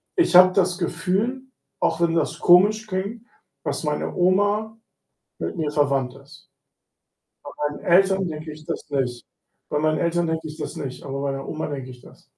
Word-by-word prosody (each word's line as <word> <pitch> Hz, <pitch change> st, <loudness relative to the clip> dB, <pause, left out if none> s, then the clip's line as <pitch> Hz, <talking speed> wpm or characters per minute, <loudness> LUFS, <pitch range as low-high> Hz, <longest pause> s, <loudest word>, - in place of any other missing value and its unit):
ich 345 Hz, -, +2 dB
habe 185 Hz, 0 st, +9 dB
das 185 Hz, -1 st, +1 dB
Gefühl, 190 Hz, +9 st, -1 dB, 0.4 s
auch 165 Hz, 0 st, 0 dB
wenn 170 Hz, -1 st, +2 dB
das 165 Hz, -3 st, -1 dB
komisch 210 Hz, +5 st, +5 dB
klingt, 200 Hz, +4 st, -4 dB, 0.4 s
dass -, -, -3 dB
meine 150 Hz, -1 st, -2 dB
Oma 205 Hz, +4 st, +2 dB, 0.7 s
mit -, -, -3 dB
mir 155 Hz, -3 st, -1 dB
verwandt 140 Hz, -4 st, +1 dB
ist. 140 Hz, +1 st, -17 dB, 1.0 s
Bei -, -, -8 dB, 0.2 s
meinen 145 Hz, -, -10 dB
Eltern 190 Hz, +1 st, +4 dB
denke 155 Hz, 0 st, -6 dB
ich 155 Hz, 0 st, -14 dB
das -, -, -5 dB
nicht. 125 Hz, -3 st, -2 dB, 0.4 s
Bei 150 Hz, -, 0 dB
meinen 155 Hz, 0 st, +1 dB
Eltern 170 Hz, 0 st, +1 dB
denke 160 Hz, 0 st, -2 dB
ich 155 Hz, 0 st, -9 dB
das -, -, -5 dB
nicht, 130 Hz, -3 st, -6 dB
aber 135 Hz, 0 st, -5 dB
meiner 135 Hz, -1 st, -3 dB
Oma 155 Hz, -1 st, -3 dB
denke 135 Hz, -3 st, -6 dB
ich 125 Hz, -1 st, -12 dB
das. -, -, -17 dB
165 Hz, 175 wpm, -23 LUFS, 145-190 Hz, 1.0 s, habe